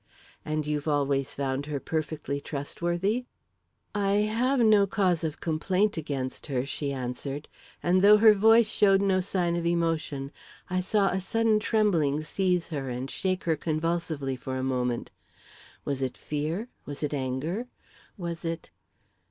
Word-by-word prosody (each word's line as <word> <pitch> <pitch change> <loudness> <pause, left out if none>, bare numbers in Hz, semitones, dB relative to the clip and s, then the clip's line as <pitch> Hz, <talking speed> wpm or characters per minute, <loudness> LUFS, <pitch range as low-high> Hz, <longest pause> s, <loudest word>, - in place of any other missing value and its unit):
"And 155 -1 -2
you've 150 0 -2
always 140 -2 +1
found 135 0 -2
her 145 -2 -2
perfectly 155 -2 -3
trustworthy?" 175 - -2 0.7
"I 200 -1 +1 0.2
have 255 +4 +2
no 215 -3 +5
cause 185 -4 +1
of 155 -1 -3
complaint 185 +6 +1
against 140 -5 -4
her," 130 -3 -1
she 140 0 -3
answered, 135 +2 -4 0.4
and 180 +2 +3
though 210 +2 +8
her 215 0 +8
voice 225 +3 +6
showed 195 -3 +4
no 195 -1 +2
sign 180 -2 0
of 170 - -1
emotion, 160 -5 -1 0.4
I 185 - +1
saw 195 +1 +2
a 190 +2 -1
sudden 225 +2 +2
trembling 170 -10 +2
seize 180 +1 0
her 140 -5 -3
and 125 +2 -4
shake 185 -1 -1
her 165 -2 +2
convulsively 155 -3 -1
for 130 +1 -5
a 130 - -2
moment. 125 -2 -1 0.7
Was 140 -2 -2
it 130 -1 -2
fear? 155 +10 -3 0.2
Was 145 +1 -6
it 150 - -1
anger? 145 - -2 0.5
Was 170 -2 -5
it 165 -1 -4
165 Hz, 150 wpm, -28 LUFS, 140-195 Hz, 0.7 s, though